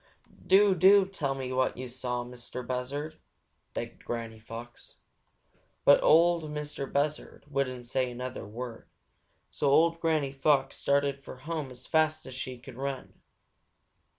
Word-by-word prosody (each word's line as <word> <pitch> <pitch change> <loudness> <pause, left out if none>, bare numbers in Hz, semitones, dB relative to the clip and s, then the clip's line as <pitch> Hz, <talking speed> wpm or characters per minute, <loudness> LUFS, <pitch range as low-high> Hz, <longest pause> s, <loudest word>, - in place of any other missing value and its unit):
"Why? - - -27
Do, 195 +1 +6
do 190 +3 +6
tell 150 -8 -2
me 130 -1 -4
what 130 -1 +1
you 130 +1 -5
saw, 125 0 -3
Mistah 125 +1 -7
Buzzard!" 140 +5 -4 0.6
begged - - -5
Granny 115 -2 -5
Fox. 115 +2 -10 0.9
But 145 - +7
Ol' 170 0 +5
Mistah 150 -2 -4
Buzzard 145 +2 -2
wouldn't 130 -3 -2
say 130 +1 0
another 125 +1 -5
word, 115 +2 -7 0.6
so 145 - +1
old 165 +4 +4
Granny 155 -5 +1
Fox 135 0 +2
started 140 -1 +1
for - - -9
home 155 -4 -3
as 125 0 -11
fast 155 -1 +1
as - - -8
she 130 0 -5
could 125 0 -12
run. 135 0 -4
135 Hz, 145 wpm, -29 LUFS, 125-155 Hz, 0.9 s, But